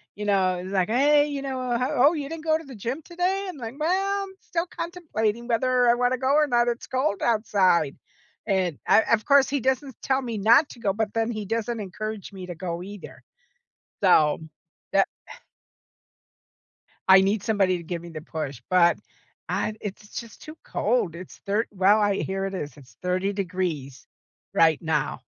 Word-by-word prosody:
you 210 - -5
know, 190 -3 +2
is, 185 +2 -7
like, 185 -1 +1
"Hey," 290 +5 +4
you 285 -2 -4
know, 255 -3 -2
"ho 250 +2 -1 0.2
oh, - - -2
you 290 -4 -3
didn't 320 +1 -7
go 315 -1 +3
to 320 - -10
the 270 -2 -10
gym 235 +8 -4
today?" 360 +5 -1
And, 295 -8 -9
I'm 230 +4 -6
"Well, 390 +5 +1
I'm 385 -1 -9
still 335 0 -2
contemplating 240 - -3
whether 250 +1 +2
I - - +6
wanna 245 +1 +1
go 265 +2 +1
or 300 0 +5
not, 240 -2 +2
it's 240 0 -2
cold 260 -5 -1
outside." 195 -9 +2 0.5
And, 185 -7 0
o - - +7
of 215 -2 +2
course, 280 -1 +5
he 285 0 0
doesn't 265 0 -1
tell 265 0 +1
me 235 -4 -4
not 235 +9 +5
to 245 - -12
go, 200 - +1
but 215 0 -2
then 225 +1 0
he 215 -3 -4
doesn't 230 +2 -2
encourage 210 +1 -6
me 185 -1 -8
to 175 - -6
go 170 0 -4
either. 205 0 -10 0.8
So 155 -6 +5 0.5
that 195 0 +4 0.2
eh - - -9 1.8
I 190 0 +8
need 200 +1 +1
somebody 195 -4 +2
to 170 - -9
give 170 0 -5
me 170 - -10
the 155 -2 -7
push, 145 -6 -5
but 175 -2 +4 0.5
I 215 - -1
it's 205 0 -6
just 230 -3 -12
too 310 +1 -10
cold, 210 -7 0
it's 180 +1 -10
thir 205 +3 +1
well, 200 +2 +4
I 205 -1 +2
here 195 0 -2
it 195 - -4
is, 150 -6 -5
it's 135 -3 -17
30 185 +2 0
degrees 175 -9 -3 0.5
right 160 -2 +4
now 160 -3 -1
215 Hz, 190 wpm, -25 LUFS, 185-260 Hz, 1.8 s, I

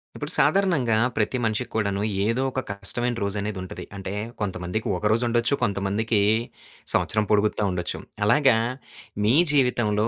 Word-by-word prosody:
ఇప్పుడు - - -3
సాధారణంగా 150 - +3 0.2
ప్రతి 115 +4 0
మనిషికి 110 +2 -2
కూడా 105 -2 +1 0.4
ఏదో 115 +4 +1
ఒక 130 - -2
కష్టమైన 120 +4 0
రోజు 100 +1 -1
అనేది 105 -1 -4
ఉంటది. 95 - -8
అంటే, 95 -1 -5 0.3
కొంతమందికి 95 +1 -3
ఒక 105 - -6
రోజు 115 +2 +2
ఉండొచ్చు. 120 +3 +1
కొంతమందికి 100 +2 0 0.7
సంవత్సరం 105 -1 +1
పొడుగుతా 105 0 +2
ఉండొచ్చు. 90 -1 -3 0.3
అలాగా 135 +1 +5 0.7
మీ 115 +5 +4 0.2
జీవితంలో 120 -6 +2
110 Hz, 135 wpm, -24 LUFS, 100-120 Hz, 0.7 s, అలాగా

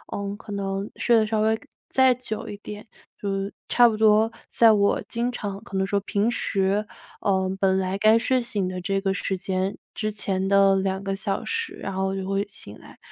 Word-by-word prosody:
嗯， 200 0 -3
可 210 - -11
能 195 0 -3
睡 235 - +3
得 215 - +3
稍 215 0 0
微 220 0 +2 0.3
再 260 -1 +5
久 225 -3 -5
一 205 - -6
点， 210 +1 -9 0.4
就 200 - -2
是 195 +1 -3 0.2
差 240 -1 +6
不 220 - 0
多 220 +1 +4 0.2
在 230 -1 +6
我 200 -1 +3
经 240 +2 -1
常 200 -4 -5
可 195 -5 -5
能 190 - +1
说 200 +1 0
平 205 +3 0
时， 200 -1 0 0.4
嗯， 190 -1 +1
本 190 -1 +2
来 190 +1 -1
该 220 +2 +6
睡 255 +2 +1
醒 205 -5 -1
的 185 0 -4
这 195 +1 0
个 195 -1 0
时 195 -1 -2
间， 190 +1 -2 0.2
之 215 0 -2
前 195 -2 -2
的 195 0 +5
2 190 0 -1
个 195 0 -2
小 195 0 -3
时， 455 0 -2
然 195 - -5
后 190 0 0
我 190 - -2
就 190 0 -4
会 195 +1 0
醒 105 - -8
来， - - -15
200 Hz, 225 characters per minute, -24 LUFS, 195-215 Hz, 0.4 s, 差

